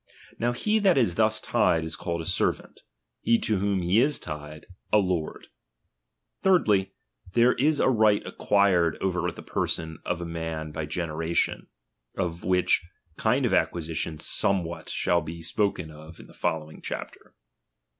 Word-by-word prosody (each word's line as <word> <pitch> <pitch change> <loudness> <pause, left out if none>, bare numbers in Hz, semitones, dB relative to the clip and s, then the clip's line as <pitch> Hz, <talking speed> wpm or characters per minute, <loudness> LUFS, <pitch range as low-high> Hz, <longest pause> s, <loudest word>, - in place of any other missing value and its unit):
Now 120 +1 +1
he 210 - +1
that 195 -6 +4
is 115 -9 +3
thus 110 +2 +2
tied, 80 -1 +2
is 80 0 -4
called 85 -2 -3
a - - -7
servant; - - -1 0.4
he 115 - +3
to 105 -3 +1
whom 100 -1 0
be 90 +5 +3
is 140 +2 +3
tied, 75 -1 -8 0.3
a 105 - +6
lord. 90 -6 -1 0.9
Thirdly, 105 - +3 0.4
there 120 +1 +5
is 150 +2 +2
a - - +3
right 110 -5 +4
ac - - -7
quired 95 -5 +3
over 90 -2 0
the 85 - -9
person 80 -1 -2
of 90 - -2
a 85 - -4
man 80 -2 -4
by 75 -1 -4
generation; 80 +1 -1 0.5
of 85 -3 -2
which 90 -1 +2 0.3
kind 125 +4 +2
of 120 - +1
acquisition 80 -1 -1
somewhat 85 0 -1
shall 85 0 +1
be 80 +2 -7
spoken 95 -5 -1
in 80 +2 -12
the - - -17
following 80 -1 -3
chapter. - - -7
90 Hz, 155 wpm, -26 LUFS, 80-110 Hz, 0.9 s, a